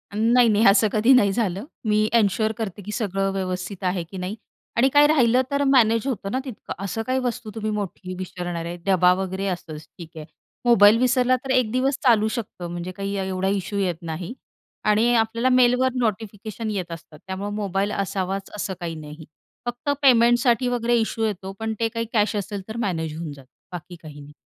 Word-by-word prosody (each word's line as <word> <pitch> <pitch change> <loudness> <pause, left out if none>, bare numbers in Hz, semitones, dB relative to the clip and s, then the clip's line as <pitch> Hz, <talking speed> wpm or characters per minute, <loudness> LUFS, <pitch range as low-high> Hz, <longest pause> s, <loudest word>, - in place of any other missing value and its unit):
नाही, 235 +2 +4
नाही 215 +2 +3
असं 200 +2 +5
कधी 225 +5 +3
नाही 205 -6 +5
झालं, 195 -1 -1 0.2
मी 215 0 +2
एन्श्योर 220 0 +2
करते 205 -3 -5
की 210 +2 -7
सगळं 195 -3 -1
व्यवस्थित 185 0 -4
आहे 180 -1 0
की 185 +3 -10
नाही 185 +4 -4 0.4
आणि 265 +3 +4
काय 290 0 +7
राहिलं 255 -4 +4
तर 280 0 +1
मॅनेज 240 -3 +3
होतं 205 -6 -3
ना 260 - 0
तितकं. 250 -5 -7
असं 200 +3 -3
काही 260 0 +1
वस्तू 240 -3 -3
तुम्ही 215 -1 -2
मोठी 190 -3 -5
विसरणार 175 -2 -5
आहे. 175 +1 -5
डबा 180 -2 +4
वगैरे 190 +1 -3
असंच 165 -4 -5 0.2
ठीक 170 -2 -9
आहे. 155 -1 -8 0.4
मोबाईल 215 -2 +7
विसरला 255 +1 +3
तर 265 - -2
1 250 -4 +2
दिवस 260 +2 +1
चालू 225 -4 +4
शकतं, 210 -7 -5
म्हणजे 175 +1 -5
काही 200 +1 -4
एवढा 190 0 -1
इशू 200 +1 -2
येत 185 -4 0
नाही 170 +6 -5 0.5
आणि 220 +3 +3
आपल्याला 230 +3 +1
मेलवर 250 0 +4
नोटिफिकेशन 220 -1 -3
येत 180 -4 -4
असतात, 165 -2 -10
त्यामुळं 195 +2 -4
मोबाईल 200 -1 -1
असावाच 195 0 -3
असं 195 -2 -3
काही 165 -2 -4
नाही. 155 0 -10 0.4
फक्त 240 +4 -4
पेमेंटसाठी 240 -1 +4
वगैरे 240 0 +1
इश्यू 225 0 -1
येतो, 195 -2 -4
पण 220 0 -2
ते 225 - +2
काही 230 0 -3
कॅश 210 -1 +2
असेल 200 0 -3
तर 220 +1 -6
मॅनेज 160 -4 -3
होऊन 165 -3 -5
जातं, 135 -2 -15 0.2
बाकी 175 0 -8
काही 150 -2 -11
नाही. 145 +1 -13
205 Hz, 190 wpm, -23 LUFS, 185-235 Hz, 0.5 s, काय